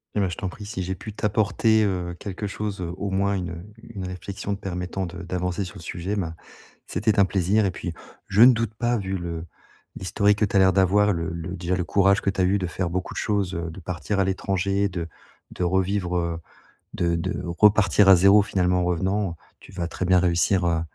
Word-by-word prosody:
Eh - - +1
ben, 95 -2 +1
je 90 - -6
t'en 95 - -3
prie, 100 +3 -8
si 100 -3 -4
j'ai 95 +1 -3
pu 95 +4 -8
t'apporter, 110 +1 +2
heu, 90 -3 -2
quelque 100 +1 -5
chose, 100 -1 -4
heu, 85 -1 -4
au 100 - -3
moins 100 +1 +1
une, 90 -3 -2
heu, 90 +5 -9 0.2
une 95 -2 -4
réflexion 100 +2 -5
permettant 90 -1 -4
de 90 +3 -8
d'avancer 90 +1 -2
sur 90 - -10
le - - -11
sujet, 90 +5 -4
ben, 85 -5 -3 0.5
c'était 105 -1 0
un 100 - +6
plaisir 100 +3 +1
et 95 - +1
puis 90 -2 -5 0.3
je 95 +3 +2
ne 125 +1 +9
doute 115 -2 -2
pas 120 +2 0
vu 95 -2 -3
le 85 -2 -5 0.5
l'historique 100 +2 +1
que 105 - +4
tu 100 - -5
as - - +6
l'air 95 0 +6
d'avoir 100 +2 +3
le 85 -1 -2
le 85 +2 -5
déjà, 90 0 -1
le 90 - -1
courage 100 +2 +3
que - - 0
tu 95 -1 -1
as - - +4
eu 95 +3 +2
de 90 - -2
faire 85 0 -3
beaucoup 90 +1 -3
de - - -6
choses, 100 -3 -1
heu, 85 0 -4
de 80 - -10
partir 90 +3 -3
à - - +4
l'étranger, 95 +1 0
de 90 -3 -4 0.4
de - - -4
revivre, 95 0 0
heu, 85 -1 -2 0.6
de 85 -1 0
de 85 - -3
repartir 100 +2 +4
à 95 - +9
0 100 +4 +6
finalement, 90 -3 +1
en - - 0
revenant, 95 +1 -1 0.2
tu - - -15
vas 85 -2 -3
très 90 +2 -3
bien 90 0 +5
réussir, 90 +1 +2
heu, 85 -1 +1
95 Hz, 230 wpm, -24 LUFS, 90-100 Hz, 0.6 s, ne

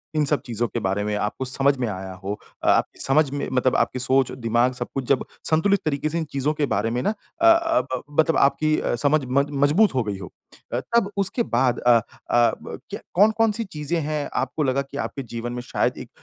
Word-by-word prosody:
इन 150 -1 +2
सब 145 0 +1
चीज़ों 120 -1 -1
के 120 - -3
बारे 95 0 -1
में 105 0 -1
आपको 105 +5 -2
समझ 135 +2 +2
में 125 -2 -1
आया 95 -1 -5
हो। 100 +1 -2 0.3
अ, - - -1
आपकी - - +1
समझ 145 +2 +3
में 145 - -3
मतलब 130 0 +2
आपकी 130 - +1
सोच, 130 +1 +2
दिमाग 120 0 +1
सब 125 -1 -4
कुछ 135 - -2
जब 135 0 +2 0.2
संतुलित 195 +6 +3
तरीके 150 0 0
से 165 - -2
इन 165 - 0
चीज़ों 140 +2 0
के 150 -1 0
बारे 105 +3 0
में 120 +1 -1
ना - - +2 0.3
अ - - +4
अ, 335 -1 +5
ब 130 -1 -5 0.2
मतलब 160 0 +4
आपकी 155 +2 +3 0.3
समझ 150 +1 +3
अ, - - -10
मज 140 +2 +2 0.2
मज़बूत 165 +6 +4
हो 125 - +2
गई 105 -3 -4
हो। 95 -3 -9 0.4
अ, - - +1 0.2
तब 210 -4 +3
उसके 200 +5 +1
बाद 125 0 +2
अ 120 - +4
अ, 120 +1 +1
ब - - -8
क्य - - -5
कौन-कौन 220 +3 +4
सी 230 +2 -3
चीज़ें 165 -2 -3
हैं 150 -1 -2
आपको 155 - -3
लगा 135 0 +1
कि 140 0 -9
आपके 135 - -6
जीवन 120 +1 -4
में 125 - -4
शायद 120 - -1
एक - - -9
135 Hz, 235 wpm, -23 LUFS, 120-155 Hz, 0.4 s, अ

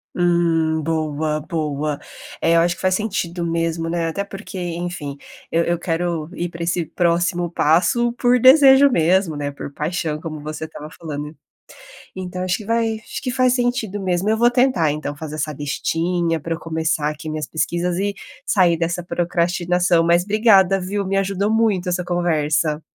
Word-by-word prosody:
Hum, 165 -2 +2
boa, 155 -1 -1
boa! 150 -2 -3 0.4
Eh, 165 - +2
eu - - +6
acho 175 +1 +2
que - - -12
faz 185 0 +2
sentido 180 -5 -2
mesmo, 165 0 -1
né, 170 -1 -1
até 200 +5 -3
porque 200 0 -9
enfim, 175 -4 -4 0.3
eu 165 +1 +2
eu 170 0 -1
quero 170 -2 -2
ir 175 0 -3
pra 170 0 -6
esse 170 0 0
próximo 175 0 0
passo 175 +10 +2
por 245 0 +3
desejo 270 +2 +7
mesmo, 170 -4 +2
né, 145 0 -3
por 140 - -8
paixão 155 +1 -3
como 155 -1 -7
você 155 +1 -5
estava 150 -1 -9
falando. 150 -2 -6 0.8
Então 185 -1 -5
acho 185 0 0
que 210 - -10
vai 230 0 0
acho - - -7
que 255 - -2
faz 255 0 +3
sentido 245 -5 -1
mesmo, 185 +1 0
eu 220 - +2
vou 240 +1 +4
tentar 245 - +2
então 150 -1 -4
fazer 155 0 -7
essa 155 0 -2
listinha 165 +4 -1
pra 165 +2 -4
eu - - -11
começar 160 -1 -1
aqui 150 +1 -7
minhas 155 -1 -4
pesquisas 175 +2 -1
e 200 +1 -1 0.3
sair 180 -4 +3
dessa 170 +2 -1
procrastinação. 175 0 +1
Mas 170 +1 +4
obrigada 200 -3 +4
viu, 200 +2 -2
me 195 - -1
ajudou 195 +1 0
muito 215 -5 +1
essa 180 0 0
conversa. 160 -3 0
175 Hz, 170 wpm, -20 LUFS, 160-190 Hz, 0.8 s, desejo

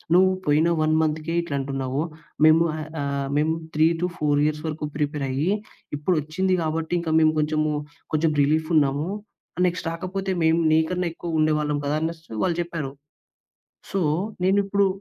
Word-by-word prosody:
నువ్వు 185 +1 +6 0.2
పోయిన 150 +3 +4 0.2
1 155 0 +2
మంత్‌కే 155 +1 -1
ఇట్లా 145 -4 -3
అంటున్నావు. 135 0 -2 0.5
మేము 160 +1 +6
ఆహ్, 155 -1 -5 0.2
ఆహ్, 140 -1 -2
మేము 155 +2 +2 0.2
3-4 160 -2 +2
ఇయర్స్ 150 0 -3
వరకు 155 -1 -3
ప్రిపేరయ్యి. 145 +1 -1 0.5
ఇప్పుడు 160 +5 +1
వచ్చింది 185 +5 0
గాబట్టి 160 +2 -1
ఇంకా 160 -2 -2
మేము 155 0 +4
కొంచెము, 155 0 +1 0.4
కొంచెం 155 +1 +2
రిలీఫ్ 155 +2 +1
ఉన్నాము. 145 +1 +2 0.5
ఆహ్, 180 - +2
నెక్స్ట్ 180 0 -1
రాకపోతే 190 +3 -3
మేము 160 +1 +3
నీకన్నా 175 +3 +1
ఎక్కువ 165 -1 -3
ఉండేవాళ్ళం 150 -1 +1
కదా!" 145 +1 0
అనేసి 160 -2 -5
వాళ్ళు 175 -2 0
జెప్పారు. 165 -5 -4 1.0
సో, 195 - 0 0.4
నేను 190 +2 +4
ఇప్పుడు 200 0 +2
155 Hz, 150 wpm, -24 LUFS, 150-170 Hz, 1.0 s, నువ్వు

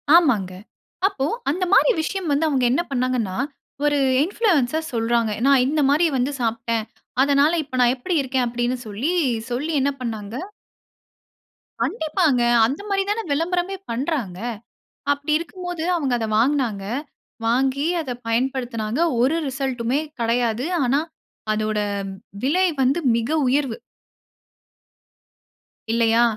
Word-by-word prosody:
ஆமாங்க. 220 - +3 0.5
அப்போ 290 -10 -2 0.2
அந்த 365 +5 0
மாரி - - +6
விஷயம் 365 0 -3
வந்து 290 +3 +2
அவங்க 270 -4 +1
என்ன 290 - +2
பண்னாங்கன்னா, 250 -7 0 0.5
ஒரு 290 0 +3 0.3
இன்ஃப்ளூயன்ஸர் 320 - +1
சொல்றாங்க. 230 -1 +1
நான் 275 -2 +5
இந்த 300 +1 +1
மாரி 310 +4 +4
வந்து 255 +3 0
சாப்டேன். 230 -1 -1 0.4
அதனால, 285 +2 +4
இப்ப 260 -2 -6
நான் 245 0 +5
எப்படி 335 +8 -2
இருக்கேன் 260 -1 0
அப்படினு 240 +1 -1
சொல்லி 245 - -1 0.4
சொல்லி 290 +7 -1
என்ன 280 - +2
பண்ணாங்க. 220 -2 -5 1.5
கண்டிப்பாங்க. 315 - +1 0.2
அந்த 275 - -2
மாரி 390 0 +2
தான 455 +2 -1
விளம்பரமே 355 +5 0 0.2
பண்றாங்க. 235 - -2 0.7
அப்படி 285 +2 -2
இருக்கும் 360 +2 -8
போது 345 -2 -3
அவங்க 275 -6 -1
அத 225 - -2
வாங்னாங்க. 235 -6 +1 0.6
வாங்கி 265 +5 +1
அத 280 -6 -5 0.2
பயன்படுத்தினாங்க. 240 0 -1 0.2
ஒரு 280 +6 +3
ரிசல்ட்டுமே 265 -1 -1 0.2
கிடையாது. 235 +2 +1 0.2
ஆனா 265 +3 +2 0.5
அதோட 215 0 -1 0.6
விலை 350 +8 +2 0.2
வந்து 270 +6 +3 0.2
மிக 230 0 -1 0.2
உயர்வு. 270 -3 +1 2.2
இல்லையா? 230 0 +3
265 Hz, 120 wpm, -22 LUFS, 235-305 Hz, 2.2 s, மாரி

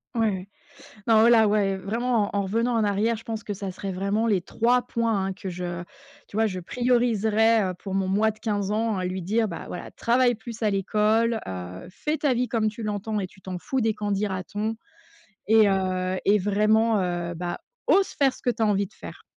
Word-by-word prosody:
Ouais, 225 -2 +3
ouais, 190 -1 -4 0.6
non 220 -1 +6
oh - - +6
là, 230 -2 +6
ouais, 200 -2 +2
vraiment 220 +3 -1
en 200 - +1
en - - 0
revenant 230 +5 0
en 220 - +2
arrière, 215 +3 +1
je 225 - -12
pense 225 -1 -5
que 205 - -4
ça 195 0 -5
serait 195 +1 -5
vraiment 200 +4 0
les 205 -4 +3
3 240 +6 +2
points 225 -6 -1
hein, 195 - -2
que 195 0 -7
je 175 -1 -4 0.5
tu 200 - -6
vois 220 0 +3
je 185 -3 -4
prioriserais, 225 -1 +2
heu, - - -6
pour 195 +1 -7
mon 195 -1 0
moi 210 +3 +2
de 215 - -20
15 205 -3 -1
ans, 220 0 0
à 185 - -2
lui 185 +1 -3
dire, 215 +4 0
bah 170 - -6
voilà: 180 - -7
«Travaille 245 0 +2
plus 230 0 -8
à 215 - +3
l'école, 215 +3 +1
heu, 90 0 -6
fais 300 +11 -2
ta 285 -4 +2
vie 250 +1 0
comme 220 -3 +1
tu 215 +2 -9
l'entends 210 0 -2
et 190 - -3
tu 190 - -21
t'en 185 -1 -5
fous 260 +8 -2
des 220 0 +2
qu'en 210 -1 -3
dira-t-on 205 +2 -2 0.7
et 220 -1 +6
heu 185 -1 0
et 205 +1 +5
vraiment, 215 +2 +2
heu, 175 -1 -2
bah, 175 +1 -4 0.3
ose 390 0 +4
faire 275 -2 +2
ce - - -16
que 245 - +2
tu 230 0 -6
as - - +4
envie 200 -1 +2
de - - -16
faire!». - - -11
210 Hz, 225 wpm, -25 LUFS, 190-225 Hz, 0.7 s, non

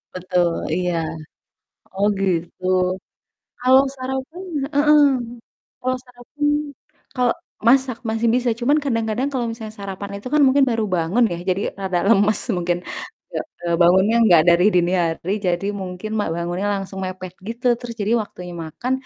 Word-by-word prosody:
Betul, 180 -1 +1 0.2
iya. 180 -1 0 1.0
Oh 200 +1 +2
gitu. 180 -1 -2 1.0
Kalau 260 +2 +6
sarapan 265 +7 -5 0.3
heeh, 295 +1 +5 0.8
kalau 255 +1 0
sarapan 250 +4 -8 0.7
kal 250 -1 +3 0.4
masak 260 -2 +3
masih 225 +1 +1
bisa 250 -1 +2
cuman 280 +5 +3
kadang-kadang 230 +1 0
kalau 250 -3 -1 0.3
sarapan 200 0 -6
itu 255 - -7
kan 300 - +5
mungkin 270 +1 +5
baru 225 -1 0
bangun 180 +8 +2
ya 170 - -3
jadi 185 +2 +1 0.2
rada 185 -2 0
lemas 205 -1 +4 0.2
mungkin, 175 0 0 0.5
nggak - - -3 0.2
eee, 170 - 0
bangunnya 190 +6 +4
nggak 175 -7 +6
dari 170 +1 +5
dini 175 0 +3
hari 165 +2 -2
jadi 175 +2 0
mungkin 185 +3 -6
ma 205 - +1
bangunnya 175 +3 -2
langsung 195 -1 -5
mepet 185 -1 -6 0.2
gitu 235 +2 -5
terus 240 -1 -7
jadi 210 +3 0
waktunya 180 -4 -9
makan, 235 +11 -4
205 Hz, 140 wpm, -21 LUFS, 180-250 Hz, 1.0 s, Kalau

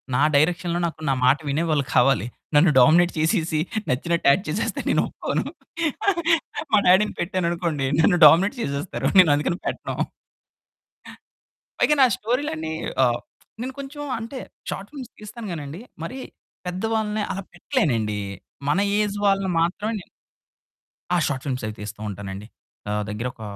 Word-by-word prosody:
నా 140 - +2
డైరెక్షన్‌లో 170 +3 +2
నాకు 160 -2 -5
నా - - +3
మాట 130 +3 +5
వినేవాళ్ళు 155 0 +1
కావాలి. 120 -4 +4 0.3
నన్ను 150 +2 +6
డామినేట్ 170 +7 +6
చేసేసి, 160 -1 +1 0.3
నచ్చినట్టు 170 +5 0
యాక్ట్ 185 +7 +1
చేసేస్తే 185 +9 -2
నేను - - +3
ఒప్పుకోను. - - -2 1.3
మా - - +7
డ్యాడీ‌ని 190 +4 +4
పెట్టాననుకోండి, 170 -6 -1
నన్ను 175 +1 +4
డామినేట్ 195 - +6
చేసేస్తారు 140 +2 -2
నేను 175 -5 +7
అందుకని 150 +4 -1
పెట్టాను. - - -2 1.8
పైగా 300 - +4
నా - - +9
స్టోరీలన్నీ 225 - -2 0.3
ఆహ్, 120 -2 +2 0.4
నేను 260 +2 -4
కొంచెం 285 +2 -7 0.2
అంటే 230 +4 -7 0.3
షార్ట్ 195 +1 -5
ఫిల్మ్స్ 265 -5 -9
తీస్తాను 215 +1 -8
గానండి, 155 +3 -6 0.2
మరీ 255 +10 -5 0.5
పెద్ద 180 +2 -4
వాళ్ళని 215 -1 0
అలా 195 +1 -4
పెట్టలేనండి. 130 - 0 0.5
మన 165 +7 +3 0.2
ఏజ్ 205 -1 0
వాళ్ళని 195 -2 +2
మాత్రమే 205 +6 -1
నె 185 - -12 1.1
ఆ! - - +4
షార్ట్ 130 -2 -3
ఫిల్మ్స్ 130 -3 -2
అవి 110 - -4
తీస్తూ 105 0 -7
ఉంటానండి. 100 +1 -7 0.4
నా 105 - -1 0.2
దగ్గరొక 115 +2 -5
170 Hz, 135 wpm, -23 LUFS, 140-205 Hz, 1.8 s, నా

